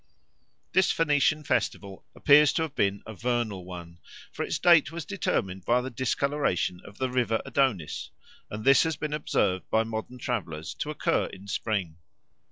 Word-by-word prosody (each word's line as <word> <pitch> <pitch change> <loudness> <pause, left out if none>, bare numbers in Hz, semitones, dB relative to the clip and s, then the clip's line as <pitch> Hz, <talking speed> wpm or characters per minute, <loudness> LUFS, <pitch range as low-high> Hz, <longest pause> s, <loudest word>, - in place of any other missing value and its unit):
This 190 - +4
Phoenician 155 -1 +2
festival 100 -8 -2
appears 150 +1 +6
to 160 - +1
have 160 -4 -5
been 100 -5 0
a 110 - -8
vernal 115 -4 -2
one, 85 -2 -9 0.3
for - - -6
its - - -2
date 170 -4 +5
was 165 -1 -6
determined 95 - -2
by 120 +4 +3
the 130 +1 -6
discoloration 130 -7 -1
of 100 - -13
the 130 -1 -1
river 120 -3 +1
Adonis, 125 - 0 0.4
and 105 +1 -6
this 135 0 +7
has 160 -1 0
been 150 0 -4
observed 95 -10 0
by 110 - +3
modern 110 +2 -5
travellers 90 -11 -4
to - - -5
occur - - 0
in 95 +2 -12
spring. 100 -6 -2
120 Hz, 165 wpm, -27 LUFS, 95-145 Hz, 0.4 s, this